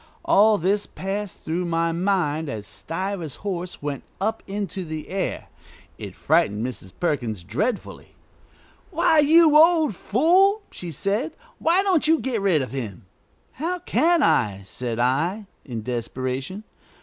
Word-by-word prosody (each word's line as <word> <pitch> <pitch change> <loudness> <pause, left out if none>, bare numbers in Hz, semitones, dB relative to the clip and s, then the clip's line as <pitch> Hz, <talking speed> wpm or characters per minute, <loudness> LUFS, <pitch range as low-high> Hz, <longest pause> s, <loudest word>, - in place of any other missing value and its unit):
All 215 +1 +5
this 200 +4 0
passed 195 +1 -5
through 170 +3 -1
my 165 0 0
mind 165 -4 0
as 105 -4 -5
Stiver's 175 - -4
horse 180 -5 -4
went 145 -2 -3 0.2
up 220 +3 -1
into 200 -1 -4
the 155 -2 -6
air. 190 0 -3 0.5
It - - -7
frightened 105 +3 +1
Mrs. 115 -7 -6
Perkins 120 - -1
dreadfully. 155 - -3 0.7
"Why, 320 - +3
you 310 +1 +6
old 320 -4 +6
fool!" 370 - +3
she 175 - -7
said; 205 - -2 0.3
"why 350 +4 +3
don't 360 -6 +2
you 320 +1 +5
get 245 -5 -2
rid 175 -8 +2
of 130 - -7
him?" 110 -10 -6 0.5
"How 340 +6 -3
can 345 -2 +2
I?" 100 - +2
said 115 +4 -4
I, 160 - 0 0.2
in 115 -5 -5
desperation. 130 - -4
185 Hz, 135 wpm, -23 LUFS, -, 0.7 s, you